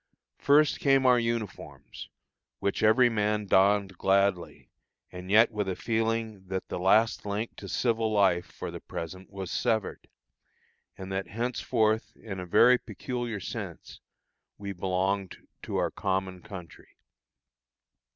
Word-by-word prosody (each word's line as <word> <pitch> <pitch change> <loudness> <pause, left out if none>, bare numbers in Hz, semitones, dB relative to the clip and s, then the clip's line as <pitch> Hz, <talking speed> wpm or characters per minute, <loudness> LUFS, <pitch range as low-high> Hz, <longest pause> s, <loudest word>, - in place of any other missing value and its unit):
First 150 +1 +4
came 135 -2 +3
our 125 -1 +6
uniforms, 115 -3 -5 0.5
which 100 - -2
every 110 +4 +5
man 105 -2 0
donned 95 -1 +2
gladly, 95 -2 0 0.4
and 90 +1 -9
yet 110 +3 +5
with 105 -3 -2
a 95 - -2
feeling 110 -3 -2
that 95 0 -4
the - - -4
last 110 +5 +3
link 105 +3 -4
to - - -9
civil 115 -2 0
life, 95 -4 +2
for - - -7
the - - -7
present, 95 +3 -7
was 95 -3 -6
severed, 110 -3 -1 0.9
and 95 0 -8
that 95 0 -2
henceforth 115 -1 -1
in 95 -4 -7
a 90 - -6
very 125 +8 +5
peculiar 120 0 -5
sense 95 -3 -7 0.6
we 100 -1 -6
belonged 95 +1 -1 0.2
to - - -4
our - - 0
common 95 -1 -2
country. 95 -6 -12
105 Hz, 130 wpm, -28 LUFS, 95-115 Hz, 0.9 s, our